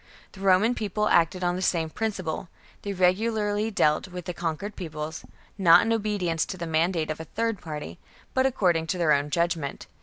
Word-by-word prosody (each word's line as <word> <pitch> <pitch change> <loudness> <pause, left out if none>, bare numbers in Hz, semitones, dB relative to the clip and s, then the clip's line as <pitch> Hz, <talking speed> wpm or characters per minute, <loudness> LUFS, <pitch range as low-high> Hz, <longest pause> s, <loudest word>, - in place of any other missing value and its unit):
The 190 - -14
Roman 195 +5 +4
People 210 -2 -1
acted 175 +2 +3
on 175 0 +1
the 185 - -4
same 165 -3 0
principle: 185 -5 -3 0.3
they 200 - -4
regularly 205 +3 +1
dealt 155 -8 +2
with 180 -1 -6
con 165 -2 -2
quered 205 +4 -7
peoples, 160 -2 -6 0.4
not 175 -2 +7
in 230 - +2
obedience 200 -7 0
to 185 - -5
the 170 - -4
mandate 160 0 0
of 155 - -5
a 160 - -6
third 225 +3 -2
party, 155 +1 -7 0.3
but 260 0 +3
according 175 -10 +1
to 180 - -1
their 165 -3 +3
own 145 +1 +1
judge 170 +3 +1
ment. 140 -4 -6
180 Hz, 190 wpm, -26 LUFS, 160-205 Hz, 0.4 s, not